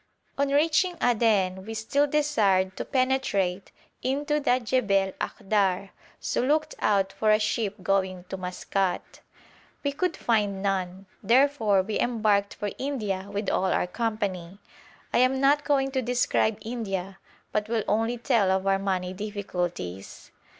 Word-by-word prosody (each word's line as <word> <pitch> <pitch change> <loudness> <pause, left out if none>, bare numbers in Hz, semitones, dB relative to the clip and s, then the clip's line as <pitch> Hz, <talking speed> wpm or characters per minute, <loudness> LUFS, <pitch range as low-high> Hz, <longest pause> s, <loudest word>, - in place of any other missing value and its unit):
On 280 0 +1
reaching 320 +5 +2
Aden 210 -6 +2
we 225 +2 -7
still 280 +7 +1
desired 210 -11 +2
to - - -4
penetrate 255 -8 0 0.3
into 290 +3 0
the 255 -3 +2
Jebel 205 -6 +1
Akhdar, 195 -1 0 0.3
so - - -1
looked 305 +4 +1
out 195 -2 +1
for 215 - 0
a 215 - +6
ship 215 -1 -1
going 190 -2 0
to - - -4
Maskat. 185 +1 -3 0.6
We 285 - +1
could 335 +5 -1
find 205 -4 0
none, 190 -1 -2 0.2
therefore 230 -4 +3
we 210 +2 -2
embarked 210 -4 +1
for 205 -1 -3
India 210 -8 -3
with 200 0 -3
all 190 - +1
our 185 - +1
company. 195 -3 -3 0.6
I - - +4
am 255 +1 +3
not 285 +2 +3
going 270 -2 +1
to 265 -1 0
describe 240 -3 +1
India, 195 -5 -4 0.3
but 210 0 -1
will 225 -2 0
only 225 +3 +1
tell 220 -4 +2
of 190 0 +1
our 195 0 +2
money 185 -2 -2
difficulties. 180 - -5
210 Hz, 145 wpm, -26 LUFS, 195-255 Hz, 0.6 s, a